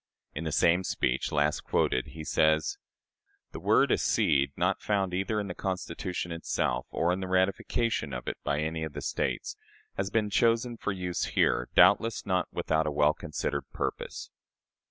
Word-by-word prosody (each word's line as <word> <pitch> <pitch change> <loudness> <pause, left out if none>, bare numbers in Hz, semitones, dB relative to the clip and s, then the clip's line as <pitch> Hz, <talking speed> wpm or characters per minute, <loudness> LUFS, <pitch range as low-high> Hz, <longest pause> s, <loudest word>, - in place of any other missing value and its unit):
In 80 +3 -5
the 80 - -2
same 90 +2 +3
speech, 65 -7 -1
last 75 +1 +1
quoted, 65 - +1
he 80 0 -8
says: 80 +1 +2 0.7
"This - - -8
word - - +4
'accede,' 70 -2 +2
not 90 +3 +1
found 95 -3 0
either 100 +4 0
in 105 - -2
the 90 - -4
Constitution 90 -1 -4
itself 65 -6 -1
or 85 +2 +1
in 90 - -2
the 95 - -4
ratification 95 +5 0
of 60 - -6
it - - -3
by 70 +1 0
any 80 +1 -2
one 80 - -2
of 75 - -14
the - - -5
States, - - -2 0.4
has 95 0 -1
been 105 0 0
chosen 115 +2 +2
for 105 - -3
use 90 -2 -2
here, - - +1
doubtless 115 0 +5
not 90 -2 +1
without 80 0 0
a - - 0
well 75 +1 +3
considered 75 -1 -3
purpose. - - -4
90 Hz, 175 wpm, -29 LUFS, 75-95 Hz, 0.7 s, doubtless